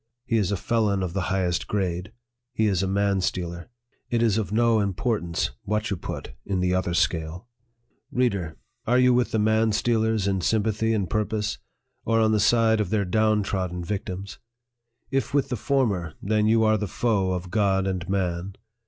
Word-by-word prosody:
He 115 -2 +1
is 100 -3 +1
a 100 - 0
felon 105 -2 +1
of 90 -2 -3
the 95 -2 -2
highest 90 -2 0
grade. 90 -2 -2 0.4
He 110 -3 +1
is 95 -4 +2
a 95 - 0
man 100 0 +1
stealer. 85 +1 -3 0.4
It 120 -1 +1
is 110 -2 +3
of 100 -4 -3
no 115 0 +3
importance 100 - -1
what 105 0 -2
you - - +1
put - - -6
in 95 -2 -2
the 90 0 +1
other 90 -2 0
scale." 80 +3 -1 0.6
Reader! 100 -11 0 0.3
are 125 +2 +4
you 125 0 +5
with 125 0 +2
the - - -1
man 110 +1 +3
stealers 110 -2 +1
in 95 -2 0
sympathy 110 +3 +1
and 100 -4 -1
purpose, 105 +2 -1 0.4
or 115 +1 +2
on 110 -1 +3
the 110 - +2
side 110 0 +3
of 100 - -2
their 105 -1 +1
down 110 +2 +2
trodden 90 -3 -3
vic 100 +3 -3
tims? 95 +1 -7 0.7
If 135 0 -1
with 140 -1 +2
the 125 - -1
former, 105 - 0
then 105 +1 +1
are - - +3
you 110 -1 +4
the 105 - -3
foe 100 -3 0
of 90 0 -5
God 100 -3 +2
and 95 -1 -3
man. 95 -1 -2
100 Hz, 190 wpm, -25 LUFS, 95-110 Hz, 0.7 s, you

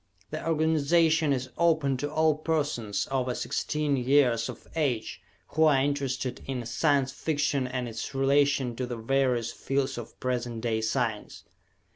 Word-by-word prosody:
The - - -4
organization 160 0 +3
is 130 -1 -2
open 160 -5 +3
to 145 +3 -3
all 155 0 +3
persons 145 -10 -1
over 130 -2 0
sixteen 150 -2 -1
years 125 -3 +3
of - - -9
age 125 - -1 0.3
who 160 +1 +3
are 145 -3 +5
interested 135 -2 -1
in 130 -3 -3
Science 135 +3 +1
Fiction 145 -3 -1
and 125 -1 -3
its 115 +3 -6
relation 135 -2 +2
to 125 - -2
the 120 -1 -4
various 125 -1 +1
fields 135 -2 -2
of 120 - -10
present 120 -2 -2
day 110 -2 0
science. 110 -1 -2
135 Hz, 145 wpm, -28 LUFS, 120-145 Hz, 0.3 s, are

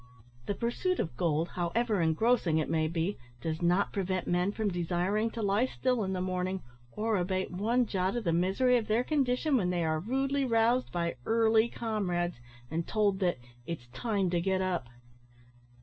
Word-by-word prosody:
The 205 - -1
pursuit 245 - -1
of 140 - -2
gold, 160 +3 0
however 205 +4 0
engrossing 165 +1 +2
it 155 0 -1
may 160 -1 +2
be, 170 +4 -2 0.2
does 160 +5 -3
not 175 +3 +2
prevent 185 -2 -1
men 180 +2 +1
from 215 0 -1
desiring 180 +5 0
to 225 0 -5
lie 205 +5 +2
still 250 -3 0
in 190 - -2
the 185 - -2
morning, 185 0 -2 0.3
or 220 0 0
abate 185 +1 -1
one 230 +7 +1
jot 190 -1 -1
of 240 - -2
the 170 -4 +1
misery 195 +9 +3
of 225 - -2
their 225 +3 +2
condition 275 0 +1
when 185 -6 +1
they 175 -1 0
are 155 0 +1
rudely 270 - 0
roused 235 0 +2
by 170 -3 -2
early 225 0 +4
comrades, 180 - -2 0.3
and 165 +1 -2
told 205 -3 +1
that 180 -6 +1 0.3
"it's 165 -8 -5
time 195 - -1
to 175 -1 +1
get 190 +1 +1
up." 185 -8 -1
190 Hz, 180 wpm, -30 LUFS, 175-230 Hz, 0.3 s, early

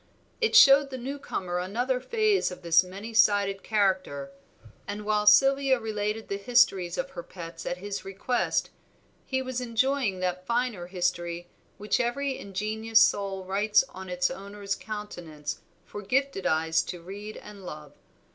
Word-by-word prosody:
It 455 - +2
showed 275 0 +8
the 260 - -5
newcomer 240 -9 -4
another 245 +8 -1
phase 430 - +1
of 180 0 -10
this 170 +1 +5
many 200 +5 -8
sided 200 -2 +3
character; 185 -10 0 0.6
and 205 +1 -5
while 210 0 +1
Sylvia 270 +4 +5
related 215 0 -3
the 200 - -3
histories 195 -6 +3
of 275 +1 -3
her 175 - -6
pets 165 -1 -9
at 175 - -2
his 200 +2 -5
request, 195 +6 -1 0.6
he 260 0 -1
was 255 -1 -3
enjoying 245 -3 0
that 180 0 -3
finer 235 -7 -1
history 175 -1 -2 0.3
which 210 +1 0
every 265 +3 -1
ingenuous 215 +3 +1
soul 195 -3 +2
writes 205 +5 +3
on 190 0 -9
its 180 0 0
owner's 200 0 -5
countenance 175 -10 -6 0.3
for 205 - -8
gifted 260 0 0
eyes 160 +1 +2
to 180 - -6
read 205 +4 -8
and 205 -2 -12
love. 150 -4 -9
205 Hz, 145 wpm, -27 LUFS, 180-240 Hz, 0.6 s, showed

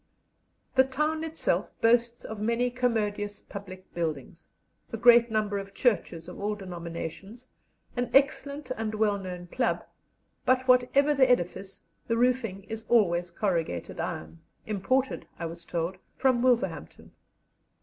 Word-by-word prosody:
The 260 - +6
town 300 +4 -1
itself 320 0 -1
boasts 235 +1 +2
of 220 -1 -6
many 235 +3 +1
commodious 210 -5 -1
public 185 -2 -10
buildings, 165 0 -4 0.4
a 230 - -3
great 235 +1 +7
number 210 -2 0
of 195 0 -9
churches 175 -9 0
of 180 - -9
all 210 +1 -1
denominations, 185 +5 -7 0.5
an 245 0 -1
excellent 280 0 +2
and 220 -1 -3
well 210 -2 +2
known 180 -2 -6
club; 245 +8 -1 0.6
but 255 0 +2
whatever 255 +4 +4
the 265 -2 +4
edifice, 190 -3 0 0.2
the 230 - +1
roofing 235 -5 +1
is 220 +2 -7
always 175 -7 +3
corrugated 170 - -2
iron, 80 +1 -4 0.3
imported, 255 +6 0
I 170 - -4
was 170 +1 -7
told, 170 +2 -2 0.2
from 255 -2 +3
Wolverhampton. 250 -2 0
220 Hz, 130 wpm, -28 LUFS, 185-250 Hz, 0.6 s, great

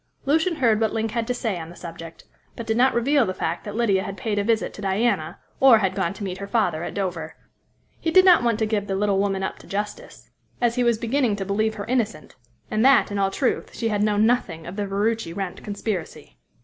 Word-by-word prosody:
Lucian 320 +5 +2
heard 230 -7 +2
what 220 -1 +1
Link 225 -1 -1
had 230 -1 -2
to 250 - 0
say 220 -7 -2
on 160 0 -7
the 175 - -12
subject, 165 -1 -10 0.3
but 230 - -6
did 220 - 0
not 255 +3 +3
reveal 275 +4 +3
the 185 -4 -3
fact - - -3
that 205 0 -7
Lydia 210 -5 +2
had 195 +1 -6
paid 205 +1 -1
a - - +1
visit 225 +1 0
to - - -10
Diana, 195 -5 0 0.2
or 265 -4 +7
had 190 -3 0
gone 190 -3 -1
to 210 - -7
meet 190 -1 -4
her 200 - -6
father 180 -7 0
at - - -6
Dover. 175 -5 -3 0.6
He 330 - -1
did 370 +3 +6
not 360 -2 +7
want 235 -3 +1
to 220 - +1
give 210 -2 -1
the 195 - -1
little 200 0 +1
woman 195 -1 0
up - - -4
to - - -15
justice, 205 +1 -6 0.3
as 240 -1 +2
he 250 0 +1
was 235 -2 +3
beginning 235 -1 0
to 195 -1 -4
believe 215 +3 0
her 205 -1 -5
innocent; 225 -8 -2 0.4
and 215 +1 +1
that, 270 -4 +5
in 205 - -2
all 195 -1 +2
truth, 250 +6 -2
she 230 - -1
had 205 -1 0
known 210 0 +3
nothing 200 -9 0
of 175 - -7
the 205 -1 -2
Ferruci 205 -2 -1
Wrent 190 -1 -5
conspiracy. 200 - -5
210 Hz, 240 wpm, -23 LUFS, 195-235 Hz, 0.6 s, or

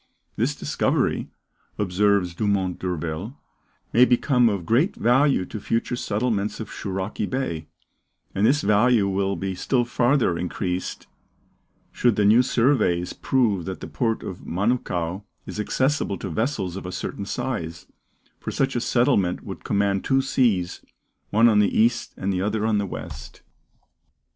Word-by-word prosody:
This - - 0
discovery, - - 0 0.5
observes 100 -2 +2
Dumont 95 -1 0
d'Urville, 90 - -4 0.6
may 120 - +7
become 125 -1 +4
of 100 -5 -3
great 135 - +2
value 130 -3 +3
to 110 - -7
future 115 +4 -1
settlements 110 -2 -1
of 110 -2 -6
Shouraki 95 +1 -3
Bay; 85 - -3 0.7
and 100 - -1
this 140 +6 +4
value 105 +1 +4
will 100 0 0
be 95 -1 -3
still 120 +6 0
farther 120 -7 +2
increased 90 +1 -3 0.9
should 120 -3 +2
the 105 - +2
new 110 +4 +6
surveys 115 -9 +2
prove 110 -10 +1
that 95 -1 -5
the - - -7
port 115 -3 -1
of 90 - -7
Manukau 95 -3 -1 0.2
is - - -7
accessible 130 -1 0
to 95 - -5
vessels 100 - -1
of 95 - -6
a - - -5
certain 100 +2 -5
size, 85 -10 -4 0.5
for - - -5
such 135 -1 0
a 120 - 0
settlement 120 -8 +2
would - - -8
command 100 -1 +1
two 135 0 +2
seas, 110 -10 +1 0.5
one 115 +3 +5
on 105 -3 +4
the 105 - +2
east 120 +2 +1
and 95 +1 -1
the 90 - -1
other 105 +2 0
on 110 -2 +2
the 100 - -2
west. 65 -6 -8
105 Hz, 150 wpm, -24 LUFS, 95-120 Hz, 0.9 s, may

